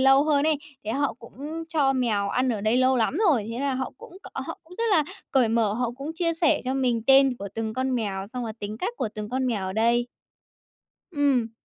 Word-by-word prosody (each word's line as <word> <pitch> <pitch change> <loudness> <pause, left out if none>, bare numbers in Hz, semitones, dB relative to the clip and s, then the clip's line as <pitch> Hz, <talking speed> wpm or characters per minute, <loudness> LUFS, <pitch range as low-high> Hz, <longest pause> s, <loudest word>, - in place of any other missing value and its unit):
lâu 270 +2 +6
hơn 290 -2 +2
ấy, 310 -2 +2 0.3
thế 215 - -3
họ 285 +4 0
cũng 230 - -13 0.4
cho 285 -5 +2
mèo 220 -6 0
ăn 255 +4 +1
ở 220 -4 -1
đây 220 +3 +2
lâu 255 0 +4
lắm 235 +6 +1
rồi. 225 -7 +1
Thế 230 - -4
là 280 -2 0
họ 260 0 -3
cũng 360 - -12 0.2
họ - - -5
cũng 355 +3 -14
rất 465 - +1
là 315 -6 +4 0.3
cởi 255 -4 +3
mở, 225 -2 +2
họ 240 +1 -1
cũng 280 +3 -5
chia 335 -1 0
sẻ 325 -2 +2
cho 260 +1 -1
mình 245 -4 +1
tên 270 -2 +6
của 200 - -5
từng 220 -1 -3
con 260 0 0
mèo, 200 -5 -2
xong 250 -1 -3
là 220 - -4
tính 210 +1 -4
cách 475 - -2
của 235 - -1
từng 210 -1 -5
con 260 +1 -1
mèo 205 -6 -1
ở 190 - -3
đây. 235 +3 +2 1.1
Ừm. 275 -6 +2
255 Hz, 235 wpm, -25 LUFS, 225-275 Hz, 1.1 s, lâu